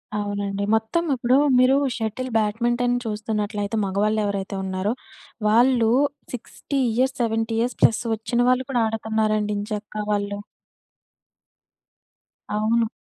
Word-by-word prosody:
అవునండి. 200 Hz, -1 st, -2 dB
మొత్తం 220 Hz, +10 st, 0 dB
ఇప్పుడు 250 Hz, +1 st, +3 dB, 0.2 s
మీరు 255 Hz, +2 st, +5 dB, 0.2 s
షటిల్ 225 Hz, +3 st, -3 dB
బ్యాడ్మింటన్ 240 Hz, +3 st, +1 dB
చూస్తున్నట్లయితే 210 Hz, -1 st, -2 dB
మగవాళ్ళు 205 Hz, +3 st, +1 dB
ఎవరైతే 200 Hz, -1 st, -3 dB
ఉన్నారో, 190 Hz, +3 st, -1 dB, 0.5 s
వాళ్ళు 235 Hz, +1 st, +4 dB, 0.4 s
60 275 Hz, +3 st, -4 dB, 0.2 s
ఇయర్స్ 260 Hz, +3 st, +1 dB
70 225 Hz, 0 st, 0 dB
ఇయర్స్ 240 Hz, +1 st, -1 dB
ప్లస్ 230 Hz, +2 st, +5 dB
వచ్చిన 235 Hz, +2 st, -2 dB
వాళ్ళు 255 Hz, +1 st, +2 dB
కూడా 245 Hz, -3 st, +2 dB
ఆడుతున్నారండి 220 Hz, -1 st, 0 dB
ఎంచక్కా 210 Hz, 0 st, -4 dB
వాళ్ళు. 205 Hz, 0 st, -1 dB, 2.2 s
అవును. 225 Hz, +2 st, +2 dB
220 Hz, 105 wpm, -23 LUFS, 205-240 Hz, 2.2 s, మీరు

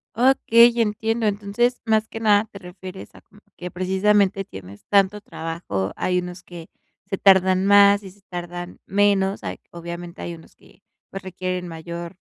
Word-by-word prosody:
Okey, 235 Hz, -1 st, +5 dB
entiendo. 225 Hz, +1 st, -1 dB
Entonces, 210 Hz, +5 st, 0 dB
más 220 Hz, 0 st, +2 dB
que 225 Hz, -, -7 dB
nada, 210 Hz, -1 st, +4 dB
te 200 Hz, -, -10 dB
refieres 185 Hz, +1 st, -10 dB
a -, -, -16 dB
como 210 Hz, -, -22 dB, 0.2 s
que 180 Hz, 0 st, -7 dB
precisamente 195 Hz, +1 st, +1 dB
tienes 95 Hz, +1 st, -12 dB
tanto 200 Hz, +1 st, +3 dB
trabajo. 160 Hz, -, -4 dB
Hay 180 Hz, 0 st, 0 dB
unos 180 Hz, +1 st, -7 dB
que 170 Hz, -2 st, -11 dB, 0.4 s
se 195 Hz, -, -2 dB
tardan 190 Hz, -1 st, +4 dB
más 200 Hz, 0 st, +6 dB
y 190 Hz, -, -10 dB
se 200 Hz, +1 st, -23 dB
tardan 175 Hz, 0 st, -7 dB
menos. 200 Hz, -1 st, +1 dB
Hay -, -, -5 dB
obviamente, 170 Hz, 0 st, -8 dB
hay 170 Hz, -, -5 dB
unos 160 Hz, -, -15 dB
que, -, -, -23 dB, 0.3 s
pues, 195 Hz, -, -7 dB
requieren 185 Hz, -1 st, -4 dB
mayor, 170 Hz, +2 st, -7 dB
190 Hz, 160 wpm, -22 LUFS, 175-205 Hz, 0.4 s, más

